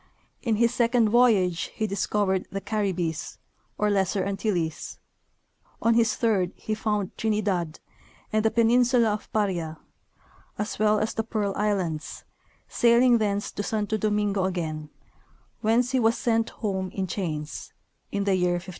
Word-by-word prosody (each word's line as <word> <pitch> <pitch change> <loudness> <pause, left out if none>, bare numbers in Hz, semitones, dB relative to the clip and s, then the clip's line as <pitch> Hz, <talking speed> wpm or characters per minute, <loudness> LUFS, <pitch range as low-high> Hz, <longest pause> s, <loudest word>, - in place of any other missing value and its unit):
In 230 -4 +1
his 235 +2 +2
second 235 -2 +3
voyage 205 -7 +3
he 220 - -1
discovered 200 -1 0
the 195 - -4
Caribbees, 190 -6 -2 0.4
or 210 0 +1
Lesser 195 -1 +1
Antilles; 195 -5 -2 0.8
on 230 - +3
his 225 -1 +3
third 200 -6 +1
he 215 - -4
found 210 -3 -2
Trinidad 200 -7 -1 0.5
and 215 0 +2
the 220 - +4
peninsula 235 0 +3
of 210 - -7
Paria, 175 -7 -1 0.8
as 210 0 -4
well 215 0 +4
as 215 +1 -1
the 225 - -1
Pearl 210 -3 -2
islands, 185 -7 -2 0.4
sailing 240 0 +4
thence 205 -1 -1
to - - -4
Santo 210 +1 -1
Domingo 205 -2 0
again, 160 -5 -3 0.7
whence 235 +3 +2
he 260 - +2
was 225 0 +3
sent 225 -1 +1
home 190 -4 -3
in 190 0 -3
chains, 160 -5 -4 0.4
in 200 0 -1
the 200 -1 +2
year 180 -1 +2
1500. 175 +2 -4
210 Hz, 145 wpm, -26 LUFS, 190-225 Hz, 0.8 s, the